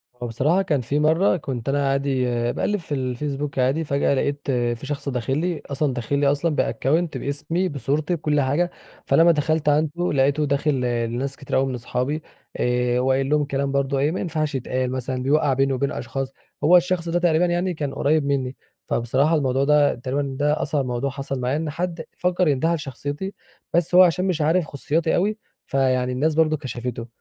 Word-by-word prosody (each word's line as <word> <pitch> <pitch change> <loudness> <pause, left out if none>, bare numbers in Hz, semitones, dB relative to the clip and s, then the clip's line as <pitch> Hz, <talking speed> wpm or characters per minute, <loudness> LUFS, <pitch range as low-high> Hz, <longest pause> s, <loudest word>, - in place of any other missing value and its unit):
هو 125 0 -5
بصراحة 150 - +1
كان 150 -8 0
في 140 +5 -1
مرّة 160 +5 +3
كنت 130 -4 -4
أنا 140 0 +1
عادي 135 -2 0 0.3
باقلّب 205 +9 -1
في 160 -3 -6
الفيسبوك 135 +2 -3
عادي 135 +6 +2
فجأة 140 -1 +1
لاقيت 145 +1 -1
في 120 0 -1
شخص 140 0 -4
داخل 125 +2 -1
لي، 170 0 -1
أصلًا 140 0 -1
داخل 125 +3 -1
لي 145 - +3
أصلًا 150 +2 0
بaccount 160 +4 0
بإسمي، 160 +6 -1
بصورتي 145 +5 -1
بكل 150 -2 +1
حاجة، 150 +7 +1 0.3
فلما 170 +1 +5
دخلت 155 0 +1
عنده 155 +4 +1
لاقيته 140 +2 +2
داخل 140 +1 +1 0.3
لناس 130 +4 -3
كتير 140 - -4
أوي 135 - +3
من 130 -1 -3
أصحابي 125 +5 -2 0.4
آآ 125 0 +1
وقايل 135 +1 +1
لهم 150 0 +3
الكلام 140 -1 -1
برضه 140 0 0
إيه 145 +3 +2
ما - - -3
ينفعش 155 -4 -2
يتقال 130 0 -2
مثلًا 130 0 -3
بيوَّقَع 145 0 +2
بيني 135 +1 +1
وبين 140 +2 -1
أشخاص. 135 +2 -4 0.3
هو 175 +4 +7
الشخص 175 -1 0
ده 175 - +1
تقريبًا 170 0 +3
يعني 175 +1 0
كان 145 -3 -4
قريب 150 +1 +1
منِّي، 135 -2 -1 0.3
فبصراحة 135 +7 +1
الموضوع 135 -2 +1
ده 150 0 +4
تقريبًا 135 +2 -3
ده 150 +1 +1
أصعب 145 -3 0
موضوع 125 +2 -2
حصل 135 0 -4
معايا 125 +4 0
إن 160 0 -2
حد 165 +1 -3
فَكّر 180 0 +1
إن - - +5
ينتحل 160 +5 +1
شخصيتي، 145 - -5 0.4
بس 175 +1 +2
هو 185 - +10
عشان 180 +1 +2
مش 180 -5 0
عارف 160 +3 +2
خصوصياتي 155 +3 -1
أوي 210 +4 +1 0.3
فيعني 130 -2 +1
الناس 150 +5 0
برضه 155 -1 +3
كشفته. 125 -4 -5
145 Hz, 185 wpm, -23 LUFS, 130-160 Hz, 0.4 s, هو